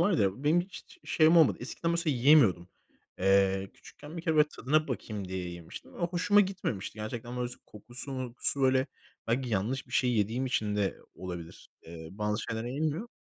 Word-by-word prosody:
var 190 +4 +3
ya, 105 - 0
benim 160 +4 +4
hiç 185 +2 -11
şeyim 160 +1 +4
olmadı. 160 -4 +5
Eskiden 165 +6 -3
mesela, 170 -4 0
yiyemiyordum. 120 - +5 0.5
Eee, 95 0 +3
küçükken 150 +3 -12
bir 165 - -5
kere 160 -1 0
böyle 150 0 +6
tadına 155 +3 +1
bakayım 105 -6 -4
diye 95 -1 -4
yemiştim. 85 -2 -10
Ve - - -12
hoşuma 180 +4 +3
gitmemişti, 180 - -3
gerçekten. 120 +3 -5
Böyle, 125 0 -1
s 125 - -8
kokusu, 120 +6 -9
mokusu, 130 +1 -2
böyle, 130 0 +3 0.4
belki 125 +2 0
yanlış 115 +5 -1
bir - - -16
şey 125 -1 +2
yediğim 115 +4 0
için 105 -5 -1
de 100 -2 0 0.2
o - - -11
olabilir. 85 -2 -8 0.2
Eee, 80 -1 -9
bazı 105 +2 -2
şeyler 115 0 -4
yenmiyor 155 - -2
125 Hz, 180 wpm, -30 LUFS, 100-155 Hz, 0.5 s, böyle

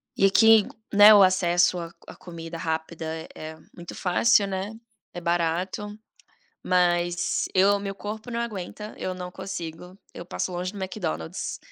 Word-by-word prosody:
e 195 - +3
aqui, 220 +1 +6 0.3
né, 205 +1 +9
o 205 - +7
acesso 180 -1 +3
a 165 -1 -6 0.2
a - - -10
comida 165 -1 -9
rápida 160 0 -4
é 160 +1 -5
é 155 0 -8 0.2
muito 175 -1 -9
fácil, 200 +3 +3
né, 195 +1 -4 0.4
é 175 - -5
barato, 175 +4 -1 0.8
mas 175 -1 +1
eu 200 +2 +4
meu 200 0 -5
corpo 215 +4 -7
não 235 0 -2
aguenta, 210 -1 -6
eu 185 - -3
não 180 0 -7
consigo, 180 -1 -7 0.2
eu 170 - -8
passo 180 - -3
longe 180 +1 -3
do 205 - -9
McDonald's. 80 - -4
180 Hz, 155 wpm, -25 LUFS, 170-200 Hz, 0.8 s, né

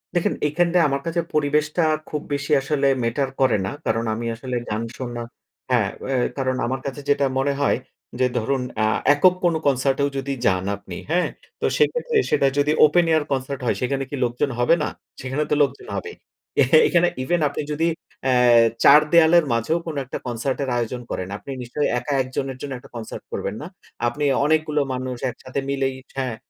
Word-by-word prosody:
দেখেন, 175 - +1
এইখানটায় 170 +2 +2
আমার 140 0 -1
কাছে 165 +1 -1
পরিবেশটা 150 +2 +1 0.3
খুব 150 -1 -3
বেশি 145 +2 -3
আসলে 140 0 0 0.2
ম্যাটার 130 +4 0
করে 130 - +4
না। - - -2 0.2
কারণ 115 +1 0
আমি 115 +2 -4
আসলে 125 +1 -5
গান 110 +2 -2
শোনা 120 -2 -5 0.5
হ্যাঁ, 110 -6 +3 0.2
অ্যা 135 -1 0 0.2
কারণ 130 -1 0
আমার 130 +2 -2
কাছে 140 +1 -5
যেটা 140 0 +3
মনে 140 +1 +1
হয় 145 - +3 0.4
যে 130 - +4
ধরুন, 130 +3 0 0.2
আ - - +3 0.3
একক 180 +5 +5
কোনো 170 -2 +3
কনসার্টেও 135 +1 +2
যদি 140 +1 -2
যান 95 -1 +2
আপনি, 95 -3 -10 0.2
হ্যাঁ? 180 +1 +2 0.3
তো - - +1
সেক্ষেত্রে 475 0 +1
সেটা 140 - +3
যদি 145 +1 +3
ওপেন 170 +3 +3
এয়ার 155 -2 +3
কনসার্ট 135 0 -2
হয়, - - +1
সেখানে 135 +2 -1
কি 145 - -4
লোকজন 125 +4 -1
হবে 120 +7 +4
না? - - 0 0.3
সেখানে 135 +4 -1
তো - - +4
লোকজন 140 -1 -3
হবেই। 95 - -5 0.5
এ - - +7 0.2
এখানে 175 0 +3 0.2
ইভেন 175 +6 +1
আপনি - - -4
যদি 155 +2 0 0.4
অ্যা 130 - +2 0.5
চার 150 +2 +9
দেয়ালের 170 0 +6
মাঝেও 115 +8 +1
কোন 160 -3 -5
একটা 125 - -5
কনসার্টের 130 +3 -2
আয়োজন 120 +1 -3
করেন, 90 - -3
আপনি 140 - -9
নিশ্চয়ই 125 +5 -1
একা 145 - -3
১ 130 - -4
জনের 135 -1 -2
জন্য 140 -2 -5
একটা 135 +2 -15
কনসার্ট 115 -2 -7
করবেন 100 - -3
না। 150 - -6 0.4
আপনি 145 +4 -3 0.2
অনেকগুলো 155 -1 +2
মানুষ 130 -1 -4
একসাথে 130 +2 -5
মিলেই 135 -1 0 0.2
হ্যাঁ, 130 -4 -2
140 Hz, 185 wpm, -22 LUFS, 125-150 Hz, 0.5 s, চার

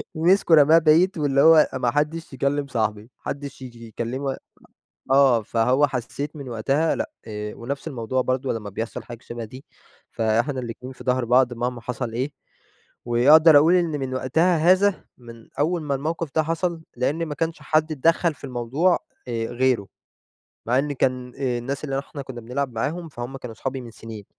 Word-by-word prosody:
مسكه 170 +1 +4
رماه 155 +2 +7
بعيد، 165 +3 +4
واللي 140 -2 +2
هو 160 -1 +7
ما 120 -1 0
حدّش 150 +2 -2
يكلّم 140 +2 -1
صاحبي، 110 -4 -1
ما 110 - -17
حدّش 140 -1 -6
ييجي 120 -2 -10
يكلّمه 130 +5 -4 0.7
آه 135 -4 +5
فهو 125 +6 +2
حسّيت 140 +3 -5
من 140 -4 -8
وقتها 135 +8 0
لأ، - - -3 0.2
ونفْس 115 +8 -5
الموضوع 130 -2 -2
برضه 130 +1 -1
لمّا 105 -2 -5
بيحصل 115 +4 -5
حاجة 120 -1 -9
شبه 120 0 -7
دي، 130 +5 -12 0.5
فإحنا 115 +5 0
الاتنين 125 +2 -7
في 125 - -13
ضهر 125 0 +1
بعض 125 +1 +3
مهما 120 0 -3
حصل 120 -1 -4
إيه، 130 +5 -2 0.7
وأقدر 145 +7 +6
أقول 160 +5 +5
إن 175 -2 +2
من 130 -1 -3
وقتها 160 +8 +2
هذا، 185 +4 +3
من 115 -2 -13
أول 165 +3 +1
ما 140 -2 -1
الموقف 160 +4 -3
ده 160 - +3
حصل، 165 +1 -2
لإن 150 +7 -1
ما 150 - -4
كانش 165 +2 -3
حد 155 0 +1
اتدخّل 165 +2 +2
في - - -17
الموضوع، 135 +8 +1 0.3
آآ، 115 -2 -2
غيره، 125 -4 0 0.8
مع 125 +3 +2
إن 145 +1 -1
كان 125 -2 -1
الناس 130 +1 -3
اللي 135 -2 -2
إحنا 140 +1 -8
كنّا 130 -3 -8
بنلعب 130 +3 -3
معاهم 160 +8 -3
فهم 125 0 -7
كانوا 120 -4 -9
صحابي 135 -1 -4
من 120 -2 -10
سنين، 110 -2 -10
135 Hz, 170 wpm, -23 LUFS, 120-155 Hz, 0.8 s, رماه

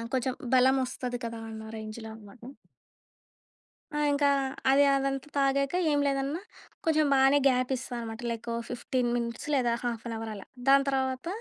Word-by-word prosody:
కొంచెం 260 0 0 0.2
బలం 260 +1 +5
వస్తది 245 -1 -4
కదా! 230 0 -4
అన్న 220 0 -8
రేంజ్‌లో 220 +1 -7
అన్నమాట. 220 +1 -15 1.5
ఆ! 295 - -2
ఇంకా, 285 0 +3 0.4
అది 280 +1 +6
అదంతా 275 +1 -1
తాగాక 275 +2 +2 0.2
ఏం 290 - +2
లేదన్నా, 275 +4 -1 0.4
కొంచెం 310 -2 +3
బానే 270 +1 +5
గ్యాప్ 255 0 +1
ఇస్తా 250 0 -7
అన్నమాట. 225 0 -6
లైక్, 230 0 -5 0.2
15 245 0 -1
మినిట్స్ 235 +3 -4
లేదా 245 -4 +2
హాఫ్ 235 -2 -3
అన్ 230 - -4
అవర్ 225 0 -5
అలా. 200 - -10 0.2
దాని 275 0 +6
తర్వాత, 265 +1 -1
255 Hz, 155 wpm, -29 LUFS, 230-275 Hz, 1.5 s, అది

